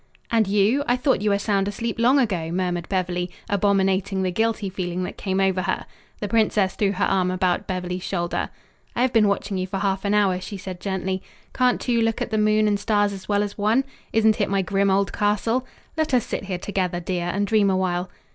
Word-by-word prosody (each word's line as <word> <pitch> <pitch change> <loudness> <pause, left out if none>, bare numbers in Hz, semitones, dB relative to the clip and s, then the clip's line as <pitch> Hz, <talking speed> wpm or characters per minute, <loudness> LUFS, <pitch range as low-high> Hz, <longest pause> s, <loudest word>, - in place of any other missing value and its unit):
"And 225 -3 +3
you? 210 +8 +3
I 245 - +3
thought 255 -3 +1
you 210 - +1
were 200 - +3
sound 200 -1 0
asleep 230 +3 -3
long 250 +4 +5
ago," 190 -11 0
murmured 175 -1 -2
Beverly, 180 -2 -1 0.2
abominating 195 -1 +1
the 185 - 0
guilty 220 +1 0
feeling 185 -1 -3
that - - -5
came 190 -1 -2
over 190 -1 +2
her. 185 +1 -2 0.4
The 205 - -1
princess 210 -2 +2
threw 200 -1 +1
her 200 - +1
arm 185 -2 +1
about 185 -1 0
Beverly's 180 -1 -3
shoulder. 175 -2 -2 0.5
"I 245 - +2
have 255 - +1
been 215 -2 +5
watching 200 -1 -1
you 185 - -2
for 195 +1 -3
half 195 -1 -1
an 205 0 +1
hour," 190 -3 +2
she 200 - -6
said 185 -2 -7
gently. 190 -1 -2 0.3
"Can't 250 -1 +2
two 235 -2 +1
look 225 0 +1
at - - -3
the 215 - +1
moon 215 0 +3
and 205 -1 +1
stars 205 -1 +1
as 190 0 -10
well 205 0 +2
as 205 0 -6
one? 220 +6 +3 0.3
Isn't 220 -1 +3
it 200 - +1
my 195 -1 +1
grim 195 +1 +1
old 195 +1 +1
castle? 225 +5 0 0.3
Let 315 -4 +1
us 245 - +2
sit - - -4
here 190 -2 -3
together, 180 -2 -2
dear, 175 0 -2
and 200 +3 0
dream 205 -1 +3
awhile." 185 -1 0
200 Hz, 220 wpm, -23 LUFS, 185-215 Hz, 0.5 s, long